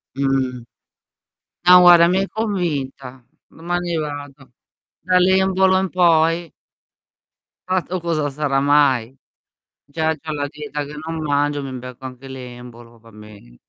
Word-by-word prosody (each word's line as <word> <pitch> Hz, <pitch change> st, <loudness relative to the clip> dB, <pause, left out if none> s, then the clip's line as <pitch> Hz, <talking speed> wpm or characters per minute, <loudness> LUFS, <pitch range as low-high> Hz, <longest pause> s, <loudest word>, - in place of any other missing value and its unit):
Mh. 130 Hz, -3 st, -1 dB, 1.0 s
No 180 Hz, 0 st, +9 dB
guarda, 175 Hz, -1 st, +7 dB
mi 180 Hz, +2 st, +2 dB
hai 195 Hz, 0 st, -1 dB
convinta, 140 Hz, -, -4 dB, 0.2 s
domani 175 Hz, +1 st, -3 dB
vado. 145 Hz, -3 st, -7 dB, 0.5 s
Dall'embolo 190 Hz, +1 st, +3 dB
in 190 Hz, -1 st, -2 dB
poi 165 Hz, -1 st, +2 dB, 1.2 s
Tra 185 Hz, 0 st, +1 dB
l'altro 180 Hz, +1 st, -3 dB
cosa 160 Hz, -3 st, -1 dB
sarà 140 Hz, -1 st, -1 dB
mai? 135 Hz, -3 st, +2 dB, 0.7 s
Già 160 Hz, +2 st, -1 dB
c'ho 155 Hz, +1 st, -7 dB
la 145 Hz, -1 st, -2 dB
dieta 150 Hz, 0 st, -6 dB
che 145 Hz, -, -10 dB
non 165 Hz, 0 st, -5 dB
mangio, 145 Hz, -1 st, -1 dB
mi 135 Hz, -, -6 dB
becco 125 Hz, +1 st, -10 dB
anche 130 Hz, +1 st, -9 dB
l'embolo, 120 Hz, -2 st, -11 dB
va 115 Hz, 0 st, -18 dB
bene 105 Hz, -, -15 dB
145 Hz, 125 wpm, -20 LUFS, 130-175 Hz, 1.2 s, No